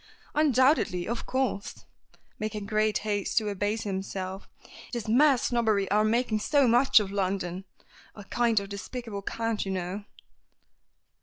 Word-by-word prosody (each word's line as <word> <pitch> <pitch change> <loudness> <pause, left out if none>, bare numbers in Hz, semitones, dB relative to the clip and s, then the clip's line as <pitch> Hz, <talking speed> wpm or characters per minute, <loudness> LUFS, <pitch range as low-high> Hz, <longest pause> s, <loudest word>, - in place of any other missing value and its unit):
"Undoubtedly. 260 - +3
Of 235 0 -4
course," 260 -6 -2 0.5
making 215 -1 -4
great 215 0 +1
haste 205 -2 -1
to 215 -2 +2
abase 205 +2 -1
himself. 190 -1 -5 0.4
"It - - -6
is 235 -2 -4
mere 270 +5 +5
snobbery 220 -6 +1
our 210 +1 +4
making 220 0 +1
so 280 +4 +3
much 245 +1 +5
of 200 -2 -3
London. 190 -2 -2 0.5
A 205 - -10
kind 230 +2 +1
of 200 - -7
despicable 210 +1 -6
cant, 225 +1 -2
you 195 - -4
know." 185 +3 -4
215 Hz, 140 wpm, -28 LUFS, 200-235 Hz, 0.5 s, mere